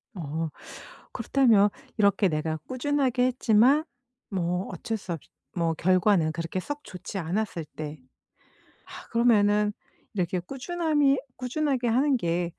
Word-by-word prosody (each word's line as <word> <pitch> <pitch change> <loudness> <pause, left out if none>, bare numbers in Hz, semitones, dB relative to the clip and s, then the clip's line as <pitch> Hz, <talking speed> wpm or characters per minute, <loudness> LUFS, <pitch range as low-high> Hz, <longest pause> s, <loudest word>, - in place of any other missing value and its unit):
어. 160 -1 -3 0.6
그렇다면 225 -7 +4 0.3
이렇게 200 -1 +4
내가 155 -1 -1
꾸준하게 260 -1 +1
했지만 255 +4 +4 0.4
뭐 180 -1 -1
어쩔 225 -1 -3
수 190 -4 -5
없이 165 - -9 0.3
뭐 165 -2 +1
결과는 180 -1 +3
그렇게 165 +3 -3
썩 290 +9 -5
좋지 185 -2 -8
않았을 175 0 -2
때 155 -1 -6 0.9
아 - - -10
그러면은 210 -3 +3 0.4
이렇게 180 -1 0
꾸준함이 290 - +1 0.2
'꾸준하게 255 0 -1
하는 265 +4 +3
게 170 -3 -1
205 Hz, 265 characters per minute, -27 LUFS, 170-255 Hz, 0.9 s, 그렇다면